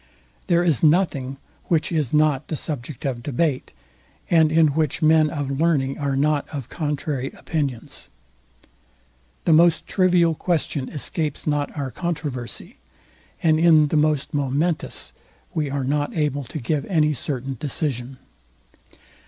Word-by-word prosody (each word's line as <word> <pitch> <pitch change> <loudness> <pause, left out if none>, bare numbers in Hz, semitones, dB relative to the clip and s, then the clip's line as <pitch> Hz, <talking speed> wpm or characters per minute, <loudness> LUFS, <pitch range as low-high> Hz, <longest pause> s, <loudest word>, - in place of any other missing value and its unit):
There 175 -2 +3
is 165 -8 +2
nothing 150 -5 +2 0.3
which 165 -3 +1
is 150 -7 0
not 150 -3 +2
the 155 - -3
subject 145 -3 -5
of 125 -3 -2
debate, 145 +1 -1 0.6
and 160 -2 +5
in 160 -1 +5
which 155 +1 -1
men 155 0 +5
of 145 -3 -3
learning 140 -5 +1
are 140 -2 -1
not 145 +1 +1
of 140 -6 -6
contrary 145 -4 -2
opinions. 140 -7 -4 1.4
The 165 - +4
most 165 +1 +4
trivial 180 -3 +3
question 155 -5 -1
escapes 150 0 -2
not 145 0 -1
our 135 -2 -3
controversy, 145 - -4 0.7
and 155 -2 +4
in 160 -3 +5
the - - -1
most 150 -2 +1
momentous 145 +4 -1 0.4
we 150 -3 -1
are 140 0 -2
not 145 +4 -1
able 145 -3 0
to 155 - -7
give 145 +2 -1
any 155 -5 +2
certain 135 -1 -4
decision. 135 -3 -3
150 Hz, 135 wpm, -23 LUFS, 135-160 Hz, 1.4 s, and